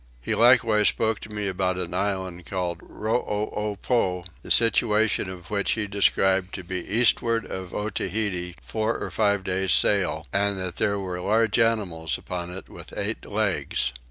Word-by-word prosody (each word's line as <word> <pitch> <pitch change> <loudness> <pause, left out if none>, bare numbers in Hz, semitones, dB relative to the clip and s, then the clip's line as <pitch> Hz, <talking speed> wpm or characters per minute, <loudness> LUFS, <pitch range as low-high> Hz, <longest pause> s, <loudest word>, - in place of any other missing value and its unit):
He - - -3
likewise 115 -3 +5
spoke 110 -2 +1
to - - -10
me 105 -1 -3
about 95 -1 -1
an 90 -1 -4
island 95 -2 -2
called 90 -3 -3
Rooopow, 105 -3 -2 0.2
the - - -11
situation 110 -3 +4
of 90 -1 -10
which 100 -1 +1
he 110 -2 -1
described 95 -2 +1
to 95 - -6
be 90 0 -3
to - - -13
the 100 - -1
eastward 115 -1 +3
of 95 -1 -6
Otaheite 95 -3 -2
four 110 +1 -1
or - - -5
five 100 -3 +1
days 95 0 0
sail, 85 -6 +2
and 100 0 +1
that 90 -2 -4
there 100 0 +1
were 90 -2 -4
large 110 +3 +2
animals 100 -9 +1
upon 90 -1 -5
it 95 +2 -7
with - - -11
eight - - -3
legs. 60 - -1
100 Hz, 165 wpm, -25 LUFS, 90-110 Hz, 0.2 s, likewise